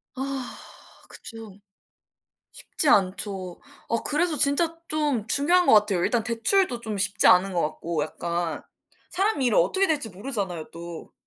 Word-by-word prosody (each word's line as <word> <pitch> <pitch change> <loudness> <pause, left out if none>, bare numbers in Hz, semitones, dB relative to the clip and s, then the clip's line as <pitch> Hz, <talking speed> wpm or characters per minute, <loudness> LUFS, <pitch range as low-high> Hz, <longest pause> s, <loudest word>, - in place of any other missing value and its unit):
아. 270 -1 -5 0.5
그쵸. 225 -4 -9 1.0
쉽지 305 - -1
않죠. 190 -5 0 0.3
어 230 - -1
그래서 310 +2 0
진짜 325 +4 +2
좀 290 -8 -1
중요한 345 +9 +3
것 - - +4
같아요. 205 -4 +2
일단 240 -2 0
대출도 240 - +3
좀 220 -4 -5
쉽지 200 +2 +3
않은 185 +2 +5
것 170 - 0
같고 160 +1 -3
약간 170 +1 -4 0.5
사람 390 -3 0
일은 245 -4 +2
어떻게 380 - +2
될지 295 -8 -1
모르잖아요 190 - -5
또. 170 0 -10
225 Hz, 270 characters per minute, -24 LUFS, 185-290 Hz, 1.0 s, 않은